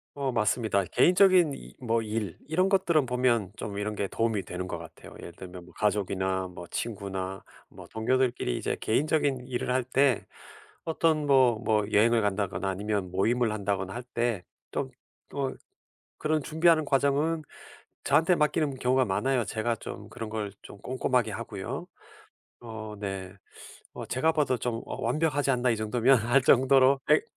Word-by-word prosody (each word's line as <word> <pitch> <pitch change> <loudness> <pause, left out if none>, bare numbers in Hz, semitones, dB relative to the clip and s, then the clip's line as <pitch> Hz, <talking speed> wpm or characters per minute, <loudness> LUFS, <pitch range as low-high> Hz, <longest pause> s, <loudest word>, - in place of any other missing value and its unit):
어 140 -2 -1
맞습니다. 110 -2 +1
개인적인 180 -4 +5
이 - - -12
뭐 115 -2 0
일 105 -4 -3
이런 180 +5 +2
것들은 170 -7 +2
보면 120 -5 +1
좀 100 -2 -6
이런 105 +1 -3
게 100 - -2
도움이 110 -1 -1
되는 90 +1 -5
것 85 - -4
같아요. 80 -1 -12
예를 85 - -9
들면 90 -1 -10
뭐 - - -17
가족이나 95 -2 0
뭐 85 -1 -10
친구나 95 -3 -4 0.2
뭐 - - -13
동료들끼리 120 - 0
이제 - - -2
개인적인 140 0 0
일을 125 0 -2
할 130 -1 +1
때 130 -1 +2 0.6
어떤 160 -2 +1
뭐 130 -5 +4
뭐 105 -2 +2
여행을 115 +3 +4
간다거나 100 -2 -1
아니면 100 -1 -2
모임을 115 +5 +1
한다거나 100 -2 -2
할 120 - -5
때 120 -6 -2 0.3
좀 - - -3 0.4
어 135 -2 -1 0.7
그런 155 0 0
준비하는 160 +1 +3
과정은 145 +4 +1 0.6
저한테 160 +5 +4
맡기는 150 -2 +1
경우가 130 +1 +2
많아요. 125 +6 0
제가 115 +2 -1
좀 - - -8
그런 115 -3 -6
걸 105 -2 -4
좀 100 - -11
꼼꼼하게 125 -1 0
하고요. 100 - -5 0.7
어 110 -2 -7
네. 95 -2 -5 0.6
어 - - -7
제가 155 +6 +2
봐도 145 -5 +1
좀 115 -1 -3
어 - - -6
'완벽하지 145 +2 +1
않나, 125 -1 +1
이 115 - +2
정도면.' 120 +4 +3
할 135 +2 +4
정도로 130 +1 +5
엑 405 - +5
120 Hz, 320 characters per minute, -28 LUFS, 100-135 Hz, 0.7 s, 개인적인